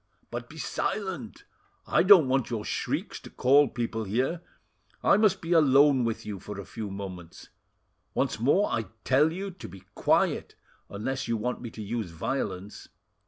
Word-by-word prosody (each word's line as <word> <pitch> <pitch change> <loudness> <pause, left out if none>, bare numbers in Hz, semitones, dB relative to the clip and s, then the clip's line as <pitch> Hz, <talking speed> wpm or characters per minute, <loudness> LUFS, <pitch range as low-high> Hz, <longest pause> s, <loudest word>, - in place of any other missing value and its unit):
But - - -6
be - - -12
silent; 190 - -3 0.4
I - - +3
don't 185 -6 +7
want 130 -1 +1
your 110 -3 -3
shrieks - - -3
to - - -12
call 140 +3 +4
people 115 -2 -3
here. 130 - -1 0.6
I - - +5
must 195 -2 +3
be 165 - -5
alone 140 -4 +5
with 115 -1 -3
you 105 -2 -5
for 105 +2 -8
a 100 - -7
few 110 -2 -6
moments. 95 -3 -8 0.7
Once - - 0
more 145 - +3
I 115 - -1 0.2
tell 145 +4 +3
you 195 +3 -5
to 180 - -10
be 95 +1 -13
quiet, - - +1 0.3
unless 135 +7 -3
you 115 - 0
want 125 +4 -3
me 120 - -6
to 110 -1 -8
use 110 -2 -3
violence. 95 +2 -4
125 Hz, 165 wpm, -28 LUFS, 105-150 Hz, 0.7 s, don't